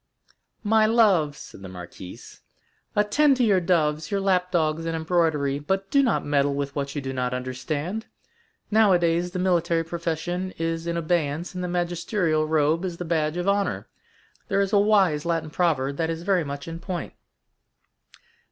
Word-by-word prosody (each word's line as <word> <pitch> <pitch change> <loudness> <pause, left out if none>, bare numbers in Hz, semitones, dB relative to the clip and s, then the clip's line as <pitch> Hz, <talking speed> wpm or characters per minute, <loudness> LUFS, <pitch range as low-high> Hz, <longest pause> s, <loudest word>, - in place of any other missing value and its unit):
"My 215 0 +4
love," 195 -11 +3
said - - -12
the 95 - -8
marquise, 90 0 -10 0.5
"attend 265 +7 +3
to 255 - +2
your 200 -5 +4
doves, 155 -3 +1
your 200 - 0
lap 185 -2 +1
dogs, 160 -2 +1
and 165 - -1
embroidery, 160 -4 +1
but 190 +6 -2
do 280 - +5
not 255 -4 +1
meddle 145 -1 +1
with 140 0 -3
what 140 0 -3
you 145 - -2
do 135 0 -4
not 125 -1 -1
understand. 145 - -4 0.6
Nowadays 180 -5 +3
the 185 - -6
military 175 -2 +1
profession 170 +2 -3
is 165 0 -2
in 170 0 -1
abeyance 165 0 -1
and 180 0 -4
the - - -2
magisterial 175 -2 0
robe 155 +2 +2
is 180 -3 -4
the 175 - -5
badge 160 -1 0
of 180 +2 -2
honor. 200 0 0 0.6
There 195 -2 +1
is 200 0 -1
a 205 - +6
wise 195 -8 +3
Latin 165 -2 -2
proverb 140 -5 0
that 165 -1 0
is 165 0 -4
very 190 -2 +2
much 140 0 -6
in 165 0 -6
point." 180 0 -5
170 Hz, 170 wpm, -25 LUFS, 150-185 Hz, 0.6 s, a